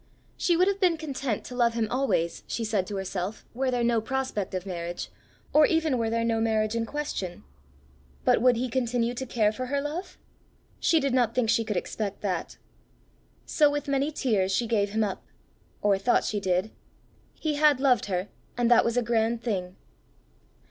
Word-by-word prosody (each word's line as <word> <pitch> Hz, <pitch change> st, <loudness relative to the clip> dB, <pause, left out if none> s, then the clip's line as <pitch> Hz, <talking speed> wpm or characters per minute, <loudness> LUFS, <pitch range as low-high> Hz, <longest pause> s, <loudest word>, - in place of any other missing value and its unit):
She 345 Hz, -2 st, +2 dB
would 365 Hz, +2 st, +4 dB
have 400 Hz, 0 st, 0 dB
been 360 Hz, -4 st, +3 dB
content 275 Hz, -7 st, -3 dB
to 250 Hz, -, -8 dB
love 235 Hz, -2 st, +2 dB
him 225 Hz, -2 st, 0 dB
always, 245 Hz, -11 st, 0 dB
she 230 Hz, -, -3 dB
said 205 Hz, -4 st, 0 dB
to 205 Hz, -, -5 dB
herself, 190 Hz, +1 st, -4 dB
were 260 Hz, +2 st, 0 dB
there 245 Hz, -1 st, 0 dB
no 235 Hz, -1 st, +2 dB
prospect 255 Hz, -6 st, -2 dB
of 185 Hz, 0 st, -3 dB
marriage, 175 Hz, -2 st, -5 dB, 0.4 s
or 300 Hz, 0 st, +7 dB
even 320 Hz, -6 st, +1 dB
were 225 Hz, -1 st, 0 dB
there 230 Hz, 0 st, 0 dB
no 225 Hz, -1 st, +1 dB
marriage 220 Hz, -1 st, +1 dB
in 230 Hz, 0 st, -1 dB
question; 285 Hz, -12 st, -4 dB, 0.8 s
but -, -, +4 dB
would 250 Hz, 0 st, +5 dB
he 250 Hz, +3 st, -1 dB
continue 240 Hz, -1 st, 0 dB
to 260 Hz, +2 st, -4 dB
care 215 Hz, -3 st, +2 dB
for 255 Hz, +4 st, -5 dB
her 280 Hz, +2 st, 0 dB
love? 300 Hz, +6 st, -5 dB, 0.6 s
She 325 Hz, -, +3 dB
did 275 Hz, -3 st, 0 dB
not 240 Hz, -3 st, +2 dB
think 230 Hz, -3 st, +2 dB
she 230 Hz, -, +2 dB
could 210 Hz, -3 st, -2 dB
expect 205 Hz, +2 st, -4 dB
that. 185 Hz, -5 st, -3 dB, 0.9 s
So 300 Hz, -2 st, +4 dB
with 290 Hz, 0 st, -3 dB
many 280 Hz, +2 st, +1 dB
tears 210 Hz, -10 st, 0 dB
she 235 Hz, +5 st, +1 dB
gave 210 Hz, -3 st, +1 dB
him 220 Hz, +2 st, 0 dB
up 200 Hz, -3 st, -3 dB, 0.6 s
or 200 Hz, -2 st, +3 dB
thought 240 Hz, +5 st, +2 dB
she 210 Hz, -, -1 dB
did. 185 Hz, +2 st, 0 dB, 0.6 s
He 310 Hz, -2 st, -2 dB
had 295 Hz, -3 st, +5 dB
loved 255 Hz, -7 st, +3 dB
her, 185 Hz, +1 st, -2 dB, 0.3 s
and 240 Hz, -1 st, +2 dB
that 240 Hz, -, +7 dB
was 235 Hz, +1 st, 0 dB
a 245 Hz, -, +3 dB
grand 230 Hz, 0 st, 0 dB
thing! 185 Hz, -5 st, -2 dB
230 Hz, 190 wpm, -27 LUFS, 210-265 Hz, 0.9 s, or